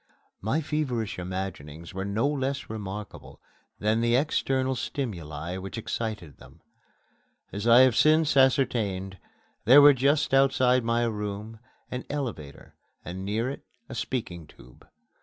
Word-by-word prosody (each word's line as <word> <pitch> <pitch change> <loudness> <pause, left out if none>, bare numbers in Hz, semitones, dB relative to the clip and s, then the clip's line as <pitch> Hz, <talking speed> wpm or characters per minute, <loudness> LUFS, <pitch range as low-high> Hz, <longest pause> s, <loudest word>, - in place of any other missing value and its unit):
My 115 +11 0
feverish 130 -10 -2
imaginings 90 -3 -6
were 95 +1 -4
no 105 +7 0
less 140 -3 -2
remarkable 105 -1 -8 0.4
than 110 +2 +1
the 120 0 +2
external 130 -1 0
stimuli 85 - -5
which 95 +4 -7
excited 110 - -5
them. - - -17 0.9
As 100 +3 -4
I 120 +2 +8
have 130 -3 +5
since 155 +1 +4
ascertained, 110 -8 +1 0.5
there 130 +6 +8
were 145 0 +9
just 140 +2 +1
outside 130 -2 +3
my 115 +1 +1
room 105 0 -5 0.3
an 125 0 -5
elevator 110 - -6 0.3
and 95 +2 -6
near 110 +5 -1
it 140 - -9 0.3
a - - -7
speaking 110 -9 -4
tube. 65 - -18
115 Hz, 130 wpm, -27 LUFS, 95-130 Hz, 0.9 s, were